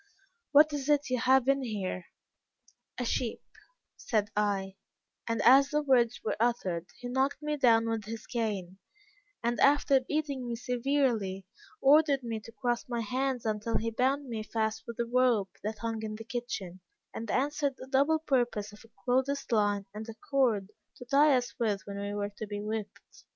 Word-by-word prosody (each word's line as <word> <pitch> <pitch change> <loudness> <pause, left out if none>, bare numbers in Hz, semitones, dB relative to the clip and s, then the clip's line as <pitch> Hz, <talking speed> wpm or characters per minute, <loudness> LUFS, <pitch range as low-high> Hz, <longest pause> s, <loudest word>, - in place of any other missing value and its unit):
'What 300 +1 +6
is 285 0 -3
it 290 -3 +2
you 255 - +1
have 260 +1 +4
in 275 0 +3
here?' 200 -7 -4 0.9
'A 250 - -2
sheep,' 235 0 -2 0.5
said 215 -2 -1
I, 195 -2 -1 0.5
and 230 - 0
as 275 +3 +7
the 300 0 0
words 245 -4 +3
were - - 0
uttered, 190 -8 0
he 245 - -7
knocked 265 +3 0
me 300 0 -1
down 230 -5 +4
with 225 -2 -2
his 225 0 -7
cane, 200 -6 -3 0.6
and 235 0 0
after 280 -1 +5
beating 280 -1 -3
me 235 - -2
severely, 240 -6 0 0.4
ordered 285 -1 +5
me 230 -2 -3
to 215 - -12
cross 240 0 -1
my 240 -1 -1
hands 255 +2 -2
until 215 +1 0
he 230 0 -2
bound 265 +4 0
me 225 -3 -4
fast 220 0 -2
with 235 -1 -7
a 235 - +1
rope 235 -5 +2
that 215 +1 -4
hung 225 -1 -3
in 215 -1 -4
the 225 - -8
kitchen, 200 -7 -5 0.3
and 225 -1 -6
answered 285 +2 0
the - - -9
double 280 +4 +3
purpose 240 -8 -1
of 210 - -14
a 225 - -19 0.2
clothes 265 +3 +1
line 205 -3 +2
and 215 +2 -7
a 225 - -7 0.2
cord 225 -8 +2 0.2
to 245 - -11
tie 280 +2 +5
us 245 -1 -3
with 210 -4 0
when 200 0 -6
we 200 0 -3
were 205 0 -2
to 215 - -5
be 205 0 -4
whipped. 210 0 -6
235 Hz, 180 wpm, -30 LUFS, 215-265 Hz, 0.9 s, as